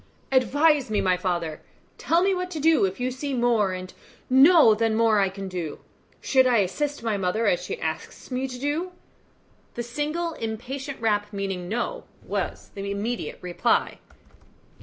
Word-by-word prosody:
"Advise 280 +1 +3
me, 215 - +1
my 185 -1 +2
father; 175 -4 -2 0.4
tell 335 +2 +2
me 390 0 +3
what 365 0 -2
to 330 -4 -5
do 315 -6 +4
if 190 +3 -4
you 250 +1 -1
see 270 +2 -4
more 235 -5 +2
and 185 0 -6 0.4
know 275 -2 +7
than 220 0 +1
more 225 -2 +4
I 195 -1 +3
can 195 0 -7
do. 175 -4 -5 0.4
Should 260 -1 +4
I 245 -2 +4
assist 280 +8 -1
my 220 -3 0
mother, 195 +4 0
as 180 -3 +2
she - - -5
asks 160 +9 -5
me 255 +1 -1
to 250 -1 -7
do?" 300 +7 -2 0.8
The 240 - -3
single 300 +7 -2
impatient 260 +4 -5
rap, 210 -2 +1
meaning 195 -3 -4
"No," 360 - -3 0.2
was - - -4
the 200 0 -5
immediate 210 +5 -3
reply. 180 +6 0
230 Hz, 165 wpm, -25 LUFS, 195-280 Hz, 0.8 s, know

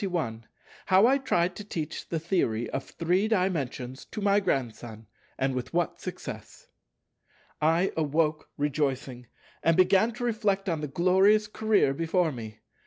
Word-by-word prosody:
§ 195 - -1
21 115 -11 -3 0.4
How 190 +3 +6
I 270 +3 +4
tried 180 -9 0
to 210 - -6
teach 160 -6 -5
the 165 - -1
Theory 120 - 0
of - - -3
Three 180 +5 0
Dimensions 145 - -1
to - - -7
my 200 0 +3
Grandson, 120 - -3 0.3
and 135 0 0
with 130 +5 -5
what 175 -1 -1
success - - -8 0.9
I 165 +5 +2
awoke 155 0 0
rejoicing, 135 -4 -2 0.3
and 165 0 +3
began 190 +4 +4
to 245 - -6
reflect 210 -4 0
on 165 -4 -1
the 150 - -3
glorious 190 +7 +4
career 215 -8 +2
before 165 +2 +1
me. 110 -4 -9
165 Hz, 150 wpm, -27 LUFS, 135-195 Hz, 0.9 s, How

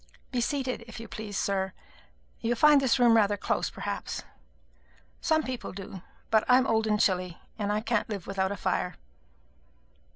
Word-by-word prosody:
Be 250 -2 0
seated, 255 -2 -1
if 230 - -9
you 230 - -8
please, 210 -1 -6
sir. 190 -1 0 0.7
You 235 +1 0
find 295 +3 +6
this 265 -2 +3
room 240 -2 +6
rather 205 -2 +3
close, - - -1
perhaps. - - -4 1.0
Some 315 -1 +2
people 255 -2 -5
do; 195 -1 -8 0.3
but 220 -1 +5
I'm 255 +1 +6
old 220 -3 +2
and 210 -1 +2
chilly, 180 -4 +1 0.2
and 205 -1 0
I 210 +1 0
can't 225 -1 0
live 200 -5 -4
without 195 -1 -1
a 200 - -3
fire." - - -1
220 Hz, 165 wpm, -28 LUFS, 200-245 Hz, 1.0 s, find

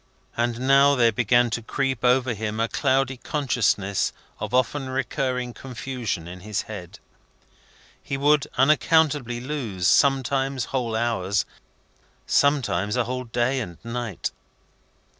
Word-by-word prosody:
And 120 0 -1
now 135 +2 +5
there 120 -3 +4
began 120 +2 +2
to 115 - -2
creep 130 +1 -2
over 125 0 +3
him 110 0 -4
a 115 - +2
cloudy 130 0 +1
consciousness 115 -9 0 0.3
of 110 - -4
often 130 +2 0
recurring 130 -1 -2
confusion 125 -9 -5
in 90 +1 -8
his 105 +2 -3
head. - - -9 1.0
He 135 - -4
would 145 +1 +3
unaccountably 145 -2 +3
lose, 120 -10 -3
sometimes 135 +2 +2
whole 120 -4 -1
hours, 105 -4 0 0.8
sometimes 120 -8 +2
a 125 - +2
whole 125 +2 -4
day 120 +3 0
and 85 -9 -6
night. 115 -4 -4
125 Hz, 120 wpm, -24 LUFS, 115-135 Hz, 1.0 s, now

